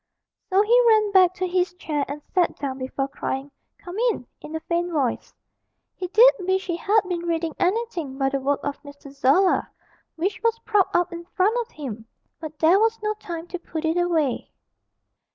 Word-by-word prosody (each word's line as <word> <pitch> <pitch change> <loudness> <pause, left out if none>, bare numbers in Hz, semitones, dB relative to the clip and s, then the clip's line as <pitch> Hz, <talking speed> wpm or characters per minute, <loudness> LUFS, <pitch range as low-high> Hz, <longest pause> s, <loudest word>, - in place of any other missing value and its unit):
So 385 +2 +4
he 480 +3 +5
ran 430 -2 +4
back 370 -2 +5
to 370 - -2
his 360 0 0
chair 300 -5 -2
and 290 +1 -7
sat 360 -2 +2
down 270 -2 -4
before 260 +1 -3
crying 275 0 -4 0.3
'Come 360 +3 -8
in' 415 - -3 0.2
in 310 - -8
a - - -1
faint 345 +1 -1
voice. 275 -7 -1 0.6
He 370 - -5
did 465 +7 +7
wish 375 +1 0
he 345 - -2
had 420 +5 +3
been 345 -1 -3
reading 330 -1 -1
anything 360 - -1
but 270 -1 +1
the 275 - 0
work 280 +1 0
of 285 0 -3
M. 285 - -9 0.2
Zola, 280 +8 +3 0.5
which 370 +5 -2
was 460 0 +1
propped 415 -3 +2
up 350 0 +1
in 340 0 -7
front 390 +5 +1
of 470 - -8
him, 235 -7 -7 0.3
but 310 -2 -8
there 330 +6 +5
was 450 +1 +2
no 425 0 0
time 335 -4 -6
to 360 - -5
put 325 -2 -5
it 320 +1 +1
away. 330 -7 0
345 Hz, 190 wpm, -24 LUFS, 295-385 Hz, 0.6 s, did